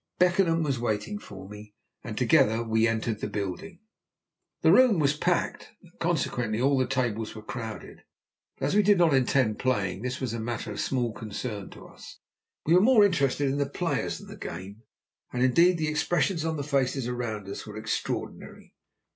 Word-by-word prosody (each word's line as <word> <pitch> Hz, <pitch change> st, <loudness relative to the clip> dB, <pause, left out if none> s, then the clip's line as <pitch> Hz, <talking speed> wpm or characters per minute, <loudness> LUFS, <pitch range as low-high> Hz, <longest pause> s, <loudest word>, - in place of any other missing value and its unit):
Beckenham 175 Hz, -2 st, +3 dB
was 140 Hz, -5 st, -1 dB
waiting 120 Hz, -, -2 dB
for 95 Hz, -, -11 dB
me, 105 Hz, 0 st, -12 dB, 0.3 s
and -, -, -6 dB
together 110 Hz, +2 st, +3 dB
we 110 Hz, 0 st, +2 dB
entered 115 Hz, -1 st, -2 dB
the -, -, -1 dB
building. 160 Hz, -, -5 dB, 0.8 s
The -, -, +5 dB
room 250 Hz, -6 st, +6 dB
was 145 Hz, -2 st, +2 dB
packed, 175 Hz, +3 st, -1 dB
and 175 Hz, -, -18 dB
consequently 120 Hz, -9 st, -1 dB
all 140 Hz, +3 st, +3 dB
the 130 Hz, -2 st, +1 dB
tables 120 Hz, -5 st, -2 dB
were 110 Hz, -, -9 dB
crowded, 110 Hz, -3 st, -7 dB, 0.6 s
but 135 Hz, -, -2 dB
as 140 Hz, -, 0 dB
we 210 Hz, -, +6 dB
did 205 Hz, 0 st, +4 dB
not 170 Hz, -4 st, +4 dB
intend 130 Hz, -4 st, +2 dB
playing, 105 Hz, -7 st, 0 dB
this 125 Hz, +2 st, -3 dB
was 125 Hz, -4 st, -3 dB
a 115 Hz, -, -3 dB
matter 115 Hz, -1 st, -4 dB
of 105 Hz, -, -6 dB
small 125 Hz, -3 st, 0 dB
concern 105 Hz, -1 st, -6 dB
to -, -, -13 dB
us. -, -, -13 dB, 0.5 s
We 160 Hz, -, +3 dB
were 180 Hz, -, +6 dB
more 220 Hz, -1 st, +6 dB
interested 145 Hz, -6 st, +1 dB
in 135 Hz, +2 st, -1 dB
the 140 Hz, -, 0 dB
players -, -, -2 dB
than -, -, -12 dB
the -, -, -10 dB
game. 95 Hz, +5 st, -8 dB, 0.5 s
And, 125 Hz, 0 st, 0 dB
indeed, 170 Hz, +8 st, +4 dB
the 155 Hz, -1 st, -1 dB
expressions 165 Hz, +2 st, 0 dB
on 160 Hz, -1 st, -1 dB
the 145 Hz, -, -3 dB
faces 135 Hz, -3 st, 0 dB
around 115 Hz, -5 st, -4 dB
us 100 Hz, -, -7 dB
were -, -, -8 dB
extraordinary. -, -, -5 dB
130 Hz, 185 wpm, -27 LUFS, 110-160 Hz, 0.8 s, room